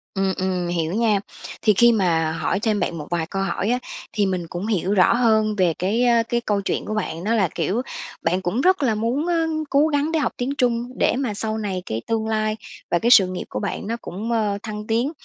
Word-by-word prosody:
Ừm, 195 -1 +1
ừm. 185 -2 -1
Hiểu 170 0 -1
nha. 220 -2 +2 0.4
Thì 215 - +4
khi 235 +4 +6
mà 165 -7 +1
hỏi 170 +4 -1
thêm 215 -2 0
bạn 170 - -2
một 150 - -7
vài 170 -2 0
câu 195 -1 -2
hỏi 195 +3 -1
á, 250 +1 +1 0.3
thì 210 -2 +2
mình 180 -3 -2
cũng 180 +6 -5
hiểu 195 -2 0
rõ 185 +1 +5
hơn 220 -3 +2
về 180 -4 +2
cái, 210 +7 +1
ơ, 235 -1 +4
cái 240 0 +1
câu 205 -3 0
chuyện - - -2
của 215 - -3
bạn. 175 -5 -3
Đó 220 - +1
là, 195 -5 +3
kiểu, 185 +9 0 0.4
bạn 180 +3 +1
cũng 200 +8 -1
rất 370 -4 +3
là 230 -5 +2
muốn, 235 +8 -1
ơ, 330 -2 +1 0.2
cố 290 +3 +4
gắng 295 +1 0
để 320 - +1
học 295 - 0
tiếng 265 +3 -2
Trung 240 0 0
để - - +3
mà 255 -4 -1
sau 215 +1 -3
này 195 -4 -3
cái 110 +1 -3
tương 220 -1 -1
lai 215 -1 0 0.4
và 175 - +3
cái 235 +1 +2
sự 195 -6 +8
nghiệp 185 0 -5
của - - -3
bạn 200 0 -4
nó 230 - -1
cũng, 215 +6 -5
ơ, 210 -3 +1
thăng 210 -1 -6
tiến. 235 +6 +1
215 Hz, 245 wpm, -22 LUFS, 185-235 Hz, 0.4 s, sự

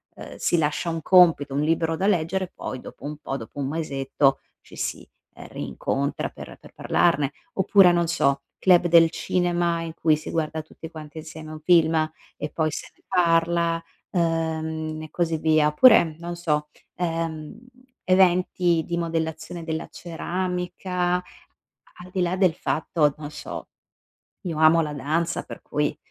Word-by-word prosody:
ehm, - - -10
si 175 - +1
lascia 150 +3 0
un 165 -1 -3
compito, 165 -7 +5
un 145 - +1
libro 165 +1 +1
da 195 - -1
leggere 185 0 +1
e 180 - -18
poi 130 - -6
dopo - - -12
un 150 0 -5
po', 135 -2 -5
dopo 115 +3 -11
1 135 - -1
mesetto 135 -3 0 0.2
ci - - -16
si, - - -4 0.3
ehm, - - -11
rincontra 105 - -3
per - - -11
per - - -16
parlarne. 150 -5 +1 0.2
Oppure, 190 -1 +5
non 170 0 +2
so, 140 -4 +1 0.2
club 180 -2 +5
del 165 -1 +6
cinema 175 -2 0
in 165 -1 -6
cui 160 -2 +2
si 155 - -8
guarda 160 -1 -2
tutte 160 +1 -11
quante 155 0 -9
insieme 155 0 -9
un 155 - -9
film, 165 -2 +4 0.4
e 150 - -4
poi 155 +1 0
se - - -6
ne - - -32
parla, 170 -2 +2 0.3
ehm, 160 -2 -1
e 155 - -9
così 165 -2 0
via. 155 -1 +3
Oppure 160 -2 +5
non 175 0 -5
so, 150 -3 -1 0.3
ehm, 165 -3 -3 0.5
eventi 180 -2 +3
di 170 0 -2
modellazione 165 0 -3
della 160 0 -4
ceramica, 180 +1 -2
a 180 - -2 0.8
al 180 - -13
di 185 - -3
là 180 +1 +1
del 185 -4 +3
fatto, 150 -2 0
non 150 -1 -7
so, - - -8 0.7
io 170 -6 -4
amo 160 +1 +6
la 150 - -3
danza 160 +5 -1
per - - -10
cui, 150 0 -1
165 Hz, 165 wpm, -24 LUFS, 155-175 Hz, 0.8 s, del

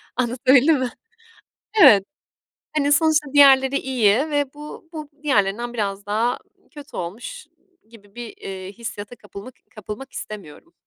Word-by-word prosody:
Anlatabildim 255 +4 +3
mi? 255 -1 -1 0.9
Evet, 200 - +8 0.7
hani, 290 -1 +2
sonuçta 305 -2 +2
diğerleri 275 -1 +6
iyi 235 -6 +2 0.2
ve 290 -2 -1
bu 300 +2 -11
bu 305 -2 -7
diğerlerinden 235 -3 0
biraz 200 -2 -3
daha 225 +4 0 0.3
kötü 290 -3 -12
olmuş 235 - -7 0.4
gibi 205 -3 -19
bir, 240 -2 -8
eee, 190 0 -8
hissiyata 220 +1 -8
kapılmak 205 +3 -11 0.2
kapılmak 215 +5 -8
istemiyorum. 210 - -9
245 Hz, 120 wpm, -22 LUFS, 205-285 Hz, 0.9 s, Evet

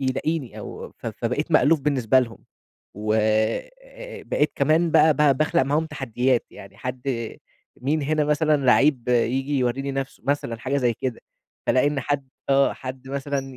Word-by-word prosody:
يلاقيني 135 +1 -2
أو - - -8
ف - - -9
فبقيت - - -2
مألوف 155 +1 +4
بالنسبة 130 -4 +2
لهم، 115 -2 -5 0.6
وآآ 110 - -2
بقيت - - 0
كمان 165 +2 +2
بقى 155 -1 +5
ب 140 -2 +3
باخلق 155 -3 +2
معاهم 150 +4 0
تحديات، 130 -4 0
يعني 100 0 -13
حد 125 0 -5 0.8
مين 145 +3 0
هنا 155 +1 +1
مثلًا 150 +1 +2
لعيب 130 -1 +4
ييجي 130 +4 +1
يوريني 130 +3 -1
نفسه؟ 135 0 -5
مثلًا 140 -5 -1
حاجة 135 +4 -2
زي 125 -4 +2
كده. 125 +2 -4 0.5
فألاقي 130 +2 +3
إن 145 -1 0
حد 140 0 -2 0.2
آه 140 0 +4
حد 130 0 -8
مثلًا 135 -1 -3
135 Hz, 150 wpm, -24 LUFS, 125-150 Hz, 0.8 s, بقى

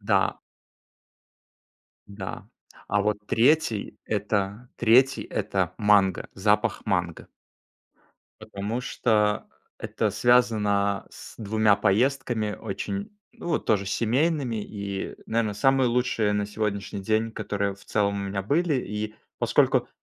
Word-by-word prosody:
Да. - - +1 1.7
Да. 100 +3 -7 0.5
А 105 - +2
вот 105 0 +1
3, 115 -3 +2
это, 105 +2 -2
3, 125 +4 +4
это - - -2
манго, 100 -3 +3
запах 105 +2 +1
манго. 90 -4 -1 1.1
Потому 110 +2 -4
что 105 -4 +1 0.3
это - - -1
связано 105 -5 +2
с - - -12
2 110 -1 +2
поездками, 110 +1 +1
очень, 200 - -4 0.2
ну, 175 - -8
вот 160 - -1
тоже, 100 -3 +2
семейными, 120 - 0
и, 100 -2 -5
наверно, 110 -2 0
самые 135 +3 +3
лучшие 120 -3 +1
на 105 0 0
сегодняшний 100 -1 -3
день, 110 +3 0
которые 100 -2 -2
в 100 - -19
целом 100 -1 0
у 100 0 -3
меня 95 0 -2
были. 155 - +1
И, 105 -3 -3 0.2
поскольку, - - +2
105 Hz, 115 wpm, -26 LUFS, 100-120 Hz, 1.7 s, 3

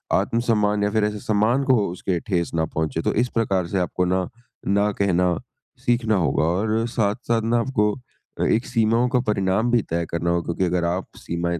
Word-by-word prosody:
आत्मसम्मान 105 -3 +1
या 105 - +2
फिर 110 -1 +1
ऐसे 105 0 -3
सम्मान 110 +7 +1
को 130 -1 +4 0.2
उसके 90 -1 -2
ठेस 85 -3 -2
ना 80 - +1
पहुँचे। 80 -2 -2
तो - - 0
इस 125 - -4
प्रकार 95 -6 0
से 95 - -2
आपको 90 0 0
ना, 90 0 0 0.4
ना 100 +1 +2
कहना 90 -3 +1 0.5
सीखना 120 -2 +2
होगा 80 -4 +1
और 110 +7 0
साथ-साथ 115 +1 0
ना 115 +1 +2
आपको 105 -4 +1 0.6
एक 115 - +1
सीमाओं 115 0 +2
का 125 -1 +2
परिणाम 105 +3 +1
भी 120 -2 +4
तय 85 0 -1
करना 85 +1 -1
होगा 85 -1 +1
क्योंकि 85 +2 -1
अगर 90 -1 0
आप 90 +2 -1
सीमाएँ 85 0 -3
100 Hz, 185 wpm, -23 LUFS, 90-115 Hz, 0.6 s, को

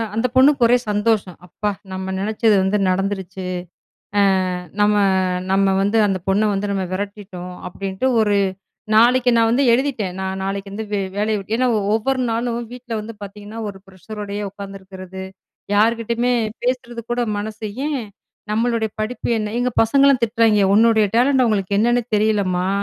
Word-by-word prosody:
அந்த 225 +3 +1
பொண்ணுக்கு 270 -1 +5
ஒரே 245 - +5
சந்தோஷம், 210 -3 0
"அப்பா 210 +4 -2 0.2
நம்ம 190 0 -4
நினைச்சது 215 +1 +2
வந்து 190 +2 +1
நடந்துருச்சு. 190 0 -2 1.1
அ - - -3 0.2
நம்ம, 210 0 +4 0.6
நம்ம 195 0 +3
வந்து 205 +3 +1
அந்த 195 -2 0
பொண்ண 210 +2 +2
வந்து 200 +1 -2
நம்ம 195 - -1
விரட்டிட்டோம்" 190 -2 -6
அப்பிடின்ட்டு 190 +6 -3
ஒரு 205 -2 +2 0.6
நாளைக்கி 245 +2 +5
நான் 225 0 +3
வந்து 260 +4 +2
எழுதிட்டேன். 235 -8 0
நான் 190 0 -3
நாளைக்கு 195 +1 -4
வந்து 220 +1 -5
வே 205 - +1 0.2
வேலைய 215 +1 +1
விட்டு 200 +3 -4
ஏன்னா 255 0 +2 0.3
ஒவ்வொரு 260 +4 0
நாளும் 235 0 -2
வீட்ல 245 -2 -7
வந்து 225 +2 -8
பார்த்தீங்கன்னா, 205 +2 -9
ஒரு 195 - -13
ப்ரெஷரோடயே 205 +2 -7
உட்காந்துருக்கிறது. 190 -1 -9 0.5
யார்க்கிட்டயுமே 230 +3 +2 0.3
பேசுறது 240 -1 -2
கூட 240 - 0 0.2
மனசு, 215 +1 -5 0.2
ஏன் 280 -5 -2 0.5
நம்மளுடைய 225 0 0
படிப்பு 220 +3 -3
என்ன? 210 -1 -3
எங்க 250 +1 +1
பசங்கள்லாம் 275 +2 +4
திட்றாங்கே, 220 -2 +3
"உன்னுடைய 220 0 +5
டேலண்ட்டு 260 +2 +4
அவுங்களுக்கு 200 -3 0
என்னன்னே 240 +2 +3
தெரிலம்மா! 200 -4 +1
215 Hz, 145 wpm, -20 LUFS, 195-235 Hz, 1.1 s, பொண்ணுக்கு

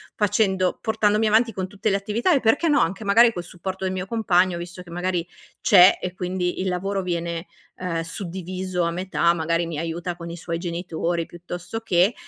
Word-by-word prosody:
facendo 195 -3 +1
portandomi 215 0 +2
avanti 225 +2 +3
con 185 -1 -3
tutte 200 +2 -2
le 200 - +2
attività, 220 - +1
e 280 - +4
perché 285 +8 +2
no, 285 - +4
anche 190 +6 0
magari 230 +3 +5
col 175 - -5
supporto 185 +2 -6
del 185 - 0
mio 185 -1 -3
compagno, 190 -5 +2
visto 175 +1 -8
che 175 - -16
magari 175 0 -2 0.3
c'è 185 -2 +7
e 180 - -3
quindi 180 0 -2
il 190 - 0
lavoro 195 +2 -1
viene, 170 -1 -3 0.3
uhm, 175 -2 -3
suddiviso 185 +1 -4
a 170 - 0
metà, 170 -1 +1
magari 165 +1 0
mi 160 -3 -4
aiuta 170 +2 -3
con 170 -1 -8
i 170 - -6
suoi 165 0 -4
genitori 170 -1 -2
piuttosto 175 +6 -7
che 190 0 +3
180 Hz, 190 wpm, -23 LUFS, 170-200 Hz, 0.3 s, c'è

